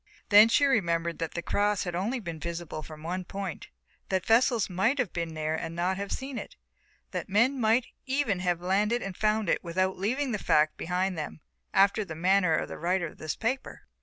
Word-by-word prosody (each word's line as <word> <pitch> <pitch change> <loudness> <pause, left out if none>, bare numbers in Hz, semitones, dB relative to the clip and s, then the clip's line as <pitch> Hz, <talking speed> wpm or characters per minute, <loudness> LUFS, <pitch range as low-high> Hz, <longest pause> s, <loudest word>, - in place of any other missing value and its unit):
Then 210 +1 +8
she 285 +5 +4
remembered 170 -10 +1
that 165 -1 -4
the 170 - -3
cross 205 +1 +1
had 175 - -3
been 175 +1 -2
only 235 +7 -1
visible 170 -3 -5
from 155 0 -11
one 180 +3 -3
point, 195 -1 -6 0.4
that 190 -1 0
vessels 230 -1 +3
might 195 +9 +1
have 250 -8 -1
been 170 -2 -3
here 155 0 -1
and 165 +1 -4
not 180 +2 0
have 200 0 -5
seen 265 -2 -4
it, - - -9 0.6
that - - -4
men 235 +7 +3
might 225 +3 +3 0.2
even 260 -8 0
have 175 -2 0
landed 210 +6 +1
and 195 -2 -5
found 215 0 +1
it - - +1
without 185 +2 -1
leaving 255 +7 0
the 210 - -1
fact 155 -2 +3
behind 180 0 -1
them, 115 - -6 0.3
after 200 +2 +4
the 165 -5 -7
manner 180 0 +3
of - - -1
the - - -8
writer 175 +1 0
of 160 - -9
this 155 - -3
paper. 255 +4 -3
190 Hz, 205 wpm, -28 LUFS, 170-220 Hz, 0.6 s, Then